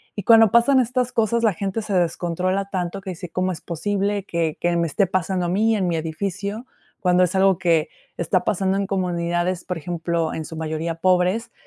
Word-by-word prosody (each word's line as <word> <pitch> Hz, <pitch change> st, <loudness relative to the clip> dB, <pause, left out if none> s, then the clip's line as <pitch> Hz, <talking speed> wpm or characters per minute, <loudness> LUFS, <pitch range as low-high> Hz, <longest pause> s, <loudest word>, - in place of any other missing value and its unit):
Y 205 Hz, -, -4 dB
cuando 225 Hz, -1 st, +7 dB
pasan 250 Hz, +3 st, +5 dB
estas 250 Hz, 0 st, 0 dB
cosas, 230 Hz, +1 st, +1 dB
la 215 Hz, -4 st, +3 dB
gente 200 Hz, +5 st, -3 dB
se 205 Hz, -, -4 dB
descontrola 180 Hz, +2 st, 0 dB
tanto 185 Hz, +1 st, -3 dB
que 190 Hz, -1 st, -6 dB
dice: 180 Hz, 0 st, -8 dB
"¿Cómo 185 Hz, +2 st, -1 dB
es 165 Hz, -, -7 dB
posible 200 Hz, +3 st, -2 dB
que 165 Hz, -4 st, -2 dB
que 175 Hz, 0 st, +1 dB
me 170 Hz, 0 st, +1 dB
esté 195 Hz, +6 st, +1 dB
pasando 185 Hz, 0 st, -1 dB
a -, -, -2 dB
mí, 220 Hz, +4 st, +2 dB
en 190 Hz, -3 st, 0 dB
mi 170 Hz, -, 0 dB
edificio?", 200 Hz, +8 st, -4 dB, 0.4 s
cuando 180 Hz, -1 st, +3 dB
es 180 Hz, -, 0 dB
algo 190 Hz, -2 st, +4 dB
que 165 Hz, -2 st, +2 dB, 0.3 s
está 180 Hz, +2 st, 0 dB
pasando 195 Hz, -1 st, +1 dB
en 200 Hz, -1 st, -1 dB
comunidades, 175 Hz, -1 st, -1 dB
por 180 Hz, -2 st, -3 dB
ejemplo, 165 Hz, 0 st, -2 dB
en 160 Hz, -, -4 dB
su 160 Hz, -, -8 dB
mayoría 160 Hz, +1 st, -3 dB
pobres 185 Hz, +6 st, +1 dB
185 Hz, 200 wpm, -22 LUFS, 170-200 Hz, 0.4 s, cuando